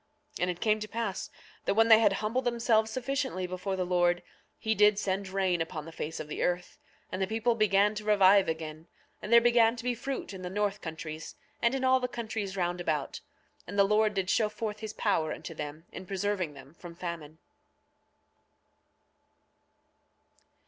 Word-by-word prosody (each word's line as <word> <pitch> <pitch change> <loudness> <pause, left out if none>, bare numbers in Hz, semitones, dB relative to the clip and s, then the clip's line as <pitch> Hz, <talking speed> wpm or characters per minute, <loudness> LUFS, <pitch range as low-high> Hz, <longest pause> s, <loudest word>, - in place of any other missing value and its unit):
9:35 - - -9
And 180 - +2
it 175 -1 -4
came 215 -1 +2
to 215 - -5
pass 220 -3 -3 0.4
that - - +1
when 225 +1 +5
they 220 -1 +8
had 225 - +4
humbled 225 +5 -1
themselves 230 -2 +2
sufficiently 255 -5 -2
before 185 +2 -3
the 185 -1 -1
Lord 175 -1 +2 0.3
he 220 - 0
did 210 -1 +5
send 195 -1 -2
rain 185 -3 +1
upon 160 -2 -4
the 165 - -9
face 160 0 -5
of 155 - -5
the 150 - -5
earth; 180 0 -1 0.3
and 190 - -3
the 190 - +1
people 225 +3 +1
began 210 -1 +3
to 210 0 -6
revive 200 -2 +5
again, 160 0 -5 0.3
and 210 - -6
there 235 - +9
began 235 -1 +4
to 230 - -8
be 250 0 0
fruit 250 -2 -5
in 190 - -8
the 180 - -5
north 205 +1 -1
countries, 160 -1 -7 0.3
and 235 +3 +2
in 265 - -2
all 260 0 +4
the 250 - -1
countries 220 -5 -4
round 175 -1 -1
about. 150 -5 -2 0.5
And 200 +4 -6
the 200 - +7
Lord 210 +1 +2
did 190 -1 0
show 215 -2 +2
forth 215 0 -4
his 220 -1 -6
power 160 -9 0
unto 165 - -6
them 150 +1 -7
in 185 - -9
preserving 195 -5 -2
them 135 +1 -13
from 170 0 -11
famine. 170 -3 -6
200 Hz, 190 wpm, -29 LUFS, 175-220 Hz, 0.5 s, there